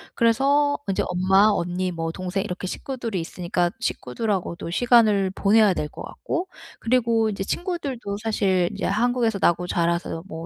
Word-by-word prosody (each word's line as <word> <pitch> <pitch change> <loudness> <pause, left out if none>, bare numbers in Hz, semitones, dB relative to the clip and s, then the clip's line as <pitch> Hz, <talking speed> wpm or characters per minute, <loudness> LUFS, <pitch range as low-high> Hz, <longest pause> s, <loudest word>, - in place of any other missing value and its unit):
그래서 280 +5 +3
인제 195 - 0
엄마, 190 +3 +4
언니, 180 -1 -1
뭐 165 -1 -3
동생 185 +3 -3
이렇게 185 -2 -5
식구들이 235 -2 -4
있으니까 175 +1 -2
식구들하고도 175 - -3
시간을 215 -4 +4
보내야 210 0 +4
될 150 - -3
것 - - -9
같고 355 +3 -4 0.3
그리고 230 -2 +2
이제 195 -2 -3
친구들도 275 - -3
사실 190 -5 +1
인제 - - -4
한국에서 230 0 +1
나고 175 +1 +2
자라서 170 -1 -1
뭐 165 -2 -7
200 Hz, 355 characters per minute, -23 LUFS, 180-230 Hz, 0.3 s, 엄마